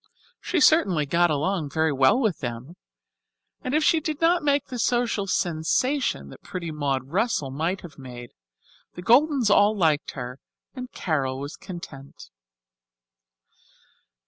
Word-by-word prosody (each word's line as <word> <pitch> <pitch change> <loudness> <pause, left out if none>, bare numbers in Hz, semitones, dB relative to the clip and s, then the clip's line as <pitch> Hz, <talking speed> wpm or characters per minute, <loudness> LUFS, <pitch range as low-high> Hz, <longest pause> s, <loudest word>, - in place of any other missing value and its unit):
She 360 - -1
certainly 195 - +4
got 170 +4 +2
along 155 +1 -1
very 160 +2 +1
well 135 - +4
with 215 - 0
them; 120 +5 -6 0.9
and 255 +3 -1
if 310 - +2
she 325 - +4
did 310 -1 -4
not 340 +1 +3
make 285 -1 +1
the 250 - -7
social 235 -4 0
sensation 175 - 0
that - - -13
pretty 170 -3 -6
Maud 135 -3 -2
Russell 185 - 0
might 165 +7 -2
have 155 -5 -12
made, 120 -2 -10 0.6
the 175 - -8
Goldens 255 - +4
all 205 +1 +4
liked 155 -5 +1
her 125 0 -7 0.3
and 255 -1 -8
Carol 135 -6 -2
was 140 +2 -6
content. 140 - -10
175 Hz, 140 wpm, -25 LUFS, -, 0.9 s, certainly